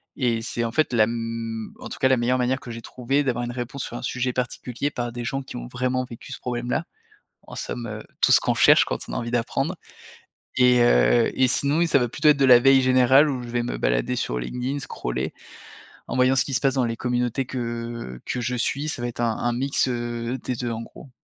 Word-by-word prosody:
et 120 -4 0
c'est, 115 +1 -2
en 115 - -2
fait, 155 +4 +1
la 115 -3 +4
m 115 -1 -4
en - - -8
tout - - -8
cas, 130 - +4
la 130 0 +3
meilleure 125 +2 +1
manière 130 +2 +1
que 120 - -9
j'ai 115 0 -7
trouvée 135 +5 -1
d'avoir 120 -3 -1
une 120 - -4
réponse 125 +3 -5
sur - - -7
un - - -5
sujet 125 0 -2
particulier 125 +1 -3
par 120 -4 -4
des 120 0 -6
gens 135 +3 -3
qui - - -10
ont - - -6
vraiment 130 - -1
vécu 120 -2 -11
ce - - -6
problème-là. 125 +5 -2 0.6
En - - -9
somme, 120 -1 -5
heu, 110 0 -6 0.2
tout - - +4
ce - - +7
qu'on - - 0
cherche - - +6
quand - - -3
on - - -6
a - - -3
envie 120 0 -3
d'apprendre 135 +8 -1 0.8
et 125 -1 +5
heu, - - +4
et 130 - +4
sinon 140 +4 +1
oui 170 - +3
ça 140 -3 +4
va 120 - +1
plutôt 150 +4 +2
être 150 - +5
de 135 - +3
la 125 -2 +8
veille 135 +1 +5
générale 130 +3 +5
où 130 -3 -3
je 120 - -8
vais 120 0 0
me 120 - -3
balader - - 0
sur 60 - -2
LinkedIn, 125 - -3
scroller - - -4 0.7
en - - -4
voyant 130 +1 +4
ce 130 - +3
qui 140 - -6
se 125 - +1
passe 135 -1 +2
dans 130 -2 +2
les 115 -1 -2
communautés 125 +1 -1
que 115 - -5
que 125 - -2
je 125 +1 -1
suis. 140 +5 -1
Ça 145 - -3
va 120 - -2
être 120 - -7
un 115 -2 0
un 120 0 0
mix, 135 +2 0
heu, 120 0 -3
des 125 - -2
2 120 0 -3
en 115 0 -4
gros. 130 +4 -13
125 Hz, 250 wpm, -24 LUFS, 115-130 Hz, 0.8 s, la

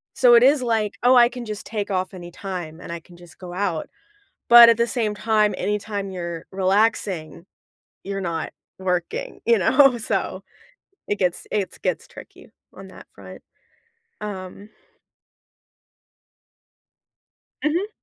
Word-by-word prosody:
So 250 -2 +5
it 235 +1 +7
is 275 0 +4
like, 220 -3 0
"Oh, 255 +1 +6
I 240 -1 +6
can 245 -1 -8
just 215 -1 -6
take 210 -2 -4
off 185 0 -2
anytime, 175 -2 -7
and - - -9
I 170 - -5
can 175 +2 -18
just 175 -2 -16
go 180 -1 -9
out," 180 -4 -2 0.6
but 235 0 +10
at 230 - +4
the 235 - +2
same 220 -4 -1
time, 215 -1 +1
anytime 205 -1 -3
you're 170 -2 -6
relaxing, 190 -4 0 0.6
you're 195 0 -4
not 170 -3 -4 0.3
working. 190 - -3
You 470 - +4
know? 275 -4 +4
So, 225 - -3 0.7
it 205 - -1
gets 180 -2 -1
it's 200 -3 -2
gets - - -2
tricky - - -14 0.2
on - - -11
that - - -14
front, - - -12 0.8
um 200 0 -7 3.0
Mhm. 340 +7 0
205 Hz, 135 wpm, -22 LUFS, 180-235 Hz, 3.0 s, but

